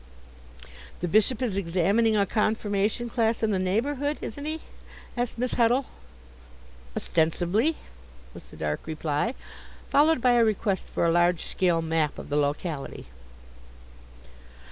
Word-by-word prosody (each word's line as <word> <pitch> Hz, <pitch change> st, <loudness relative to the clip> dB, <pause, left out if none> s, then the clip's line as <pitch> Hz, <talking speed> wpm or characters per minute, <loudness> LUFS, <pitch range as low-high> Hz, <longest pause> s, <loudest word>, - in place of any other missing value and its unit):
"The 175 Hz, -, 0 dB
Bishop 215 Hz, +6 st, +2 dB
is 225 Hz, -6 st, -1 dB
examining 200 Hz, +5 st, +2 dB
a 200 Hz, -, +3 dB
confirmation 210 Hz, +2 st, 0 dB
class 230 Hz, -1 st, 0 dB
in 220 Hz, -, +2 dB
the 190 Hz, -, +1 dB
neighbourhood, 275 Hz, +10 st, 0 dB
isn't 285 Hz, +6 st, -6 dB
he?" 315 Hz, +1 st, -3 dB, 0.5 s
asked 245 Hz, -1 st, -2 dB
Miss 250 Hz, +1 st, -1 dB
Huddle. 245 Hz, +3 st, +3 dB, 1.1 s
"Ostensibly," 175 Hz, -, +1 dB, 0.6 s
was -, -, -11 dB
the -, -, -15 dB
dark 75 Hz, -, -3 dB
reply, 155 Hz, -, -1 dB, 0.6 s
followed 305 Hz, +1 st, +4 dB
by 250 Hz, +1 st, +4 dB
a 240 Hz, -1 st, +5 dB
request 210 Hz, -3 st, 0 dB
for -, -, -1 dB
a 165 Hz, -, +3 dB
large 175 Hz, 0 st, +2 dB
scale 175 Hz, -3 st, +1 dB
map 160 Hz, -2 st, 0 dB
of -, -, -8 dB
the 145 Hz, -, -1 dB
locality. 145 Hz, +1 st, -2 dB
210 Hz, 130 wpm, -26 LUFS, 170-240 Hz, 1.1 s, a